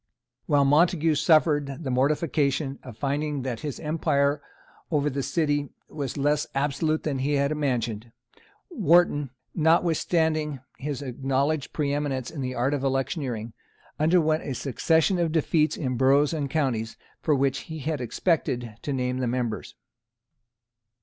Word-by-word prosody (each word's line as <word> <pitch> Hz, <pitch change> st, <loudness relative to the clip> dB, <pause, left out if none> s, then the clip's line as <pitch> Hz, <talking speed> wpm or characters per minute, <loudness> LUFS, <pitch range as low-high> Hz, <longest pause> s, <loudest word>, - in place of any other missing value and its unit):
While 145 Hz, -1 st, +4 dB
Montague 160 Hz, +2 st, +4 dB
suffered 150 Hz, -2 st, +2 dB
the 135 Hz, -, -2 dB
mortification 140 Hz, +1 st, +1 dB
of 120 Hz, -4 st, -11 dB
finding 145 Hz, +1 st, -1 dB
that 125 Hz, -3 st, -3 dB
his 145 Hz, -4 st, -5 dB
empire 145 Hz, -2 st, +1 dB, 0.5 s
over 150 Hz, -2 st, +1 dB
the 140 Hz, +1 st, -2 dB
city 145 Hz, 0 st, 0 dB, 0.2 s
was 140 Hz, -4 st, -4 dB
less 145 Hz, +1 st, +1 dB
absolute 145 Hz, +3 st, 0 dB
than 140 Hz, -4 st, -2 dB
he 140 Hz, +3 st, 0 dB
had 140 Hz, 0 st, +1 dB
imagined, 120 Hz, -6 st, -2 dB, 0.6 s
Wharton, 155 Hz, -4 st, +3 dB, 0.2 s
notwithstanding 160 Hz, -2 st, +1 dB, 0.2 s
his 145 Hz, 0 st, -4 dB
acknowledged 135 Hz, +3 st, -1 dB
preeminence 145 Hz, -3 st, -2 dB
in 155 Hz, -4 st, -6 dB
the 130 Hz, -1 st, -3 dB
art 130 Hz, +4 st, +1 dB
of 140 Hz, -2 st, -2 dB
electioneering, 130 Hz, -4 st, -2 dB, 0.5 s
underwent 155 Hz, 0 st, +3 dB
a 135 Hz, -, -4 dB
succession 160 Hz, -, +1 dB
of 170 Hz, -2 st, +1 dB
defeats 155 Hz, -1 st, +1 dB
in 130 Hz, -4 st, -2 dB
boroughs 140 Hz, +4 st, +4 dB
and 145 Hz, -3 st, -2 dB
counties 125 Hz, -7 st, -1 dB, 0.2 s
for 150 Hz, -, +2 dB
which 140 Hz, 0 st, +1 dB
he 160 Hz, -, -5 dB
had 150 Hz, -1 st, -3 dB
expected 120 Hz, -, -1 dB
to 145 Hz, -, -3 dB
name 125 Hz, -1 st, -1 dB
the 125 Hz, -, 0 dB
members. 120 Hz, -2 st, -3 dB
145 Hz, 135 wpm, -26 LUFS, 130-155 Hz, 0.6 s, While